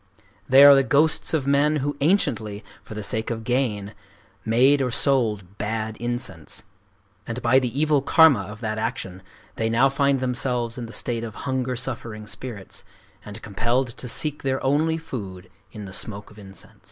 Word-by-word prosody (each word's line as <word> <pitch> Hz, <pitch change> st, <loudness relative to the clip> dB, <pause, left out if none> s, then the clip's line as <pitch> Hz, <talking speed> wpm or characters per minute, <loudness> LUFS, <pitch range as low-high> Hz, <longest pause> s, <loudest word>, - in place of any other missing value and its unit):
They 135 Hz, +2 st, +8 dB
are 145 Hz, 0 st, +10 dB
the 135 Hz, -, +5 dB
ghosts 150 Hz, +4 st, +2 dB
of 155 Hz, -5 st, 0 dB
men 140 Hz, +2 st, +3 dB
who 145 Hz, 0 st, -2 dB
anciently, 120 Hz, -, 0 dB, 0.2 s
for 110 Hz, -, -10 dB
the 105 Hz, -, -5 dB
sake 110 Hz, +2 st, -1 dB
of 115 Hz, -1 st, -4 dB
gain, 110 Hz, -5 st, -1 dB, 0.5 s
made 130 Hz, +6 st, +4 dB
or 130 Hz, -, 0 dB
sold 110 Hz, -8 st, 0 dB
bad 110 Hz, 0 st, -3 dB
incense; 120 Hz, -9 st, -4 dB, 0.6 s
and 115 Hz, +1 st, -4 dB
by 125 Hz, +3 st, +5 dB
the 125 Hz, +1 st, -3 dB
evil 150 Hz, -2 st, +3 dB
karma 155 Hz, -5 st, +5 dB
of 105 Hz, +3 st, -10 dB
that 110 Hz, -1 st, -3 dB
action 95 Hz, -6 st, -4 dB, 0.4 s
they 110 Hz, 0 st, 0 dB
now 120 Hz, +4 st, +4 dB
find 140 Hz, 0 st, +1 dB
themselves 125 Hz, -2 st, -2 dB
in 120 Hz, -, -5 dB
the -, -, -10 dB
state 115 Hz, 0 st, -3 dB
of 110 Hz, -3 st, -7 dB
hunger 130 Hz, -2 st, -1 dB
suffering 115 Hz, -4 st, -5 dB
spirits, 105 Hz, -2 st, -7 dB, 0.4 s
and 105 Hz, +2 st, -10 dB
compelled 120 Hz, +5 st, 0 dB
to 125 Hz, +1 st, -7 dB
seek 150 Hz, +4 st, -1 dB
their 135 Hz, -1 st, -2 dB
only 155 Hz, +4 st, +1 dB
food 100 Hz, -, -8 dB, 0.2 s
in 105 Hz, -1 st, -8 dB
the 95 Hz, -, -10 dB
smoke 100 Hz, 0 st, -6 dB
of 105 Hz, -, -15 dB
incense. 95 Hz, -1 st, -13 dB
120 Hz, 175 wpm, -23 LUFS, 110-135 Hz, 0.6 s, are